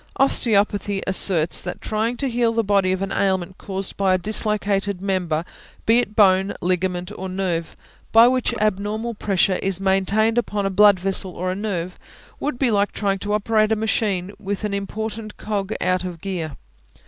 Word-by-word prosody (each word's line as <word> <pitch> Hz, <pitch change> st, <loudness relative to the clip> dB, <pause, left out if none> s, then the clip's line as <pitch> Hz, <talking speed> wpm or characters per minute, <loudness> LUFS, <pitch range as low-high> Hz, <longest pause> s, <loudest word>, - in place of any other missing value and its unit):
Osteopathy 205 Hz, -6 st, +2 dB
asserts 180 Hz, -3 st, +2 dB
that 180 Hz, -, -6 dB
trying 220 Hz, +3 st, -2 dB
to 275 Hz, -, -1 dB
heal 235 Hz, -2 st, +1 dB
the 230 Hz, 0 st, +1 dB
body 195 Hz, -2 st, +2 dB
of 185 Hz, +1 st, -1 dB
an 195 Hz, -, -4 dB
ailment 190 Hz, -1 st, -1 dB
caused 195 Hz, -1 st, -4 dB
by 190 Hz, -2 st, +3 dB
a -, -, +2 dB
dislocated 205 Hz, -1 st, -1 dB
member, 180 Hz, -4 st, -1 dB, 0.4 s
be 230 Hz, +2 st, +5 dB
it 245 Hz, -, 0 dB
a -, -, -21 dB
bone, 195 Hz, -2 st, +4 dB
ligament, 180 Hz, +1 st, -1 dB
or 190 Hz, 0 st, -5 dB
nerve, 185 Hz, -3 st, -2 dB, 0.3 s
by 225 Hz, +1 st, +8 dB
which 255 Hz, 0 st, +1 dB
abnormal 215 Hz, +3 st, -1 dB
pressure 195 Hz, -3 st, +1 dB
is 195 Hz, -1 st, -1 dB
maintained 195 Hz, +4 st, +2 dB
upon 205 Hz, -3 st, -2 dB
a 195 Hz, -, 0 dB
blood 205 Hz, 0 st, +6 dB
vessel 190 Hz, 0 st, 0 dB
or 185 Hz, +1 st, -2 dB
a -, -, -3 dB
nerve, 185 Hz, -4 st, -4 dB, 0.4 s
would 290 Hz, -4 st, -2 dB
be 250 Hz, -2 st, +2 dB
like 205 Hz, -1 st, +2 dB
trying 195 Hz, -2 st, -1 dB
to 205 Hz, +2 st, -3 dB
operate 215 Hz, +1 st, +2 dB
a -, -, +4 dB
machine 210 Hz, -4 st, -1 dB
with 205 Hz, -1 st, -4 dB
an 210 Hz, -1 st, -2 dB
important 215 Hz, +2 st, -5 dB
cog 205 Hz, -1 st, -3 dB
out 185 Hz, 0 st, 0 dB
of 180 Hz, -2 st, -6 dB
gear. 165 Hz, -6 st, -4 dB
200 Hz, 180 wpm, -22 LUFS, 185-215 Hz, 0.4 s, by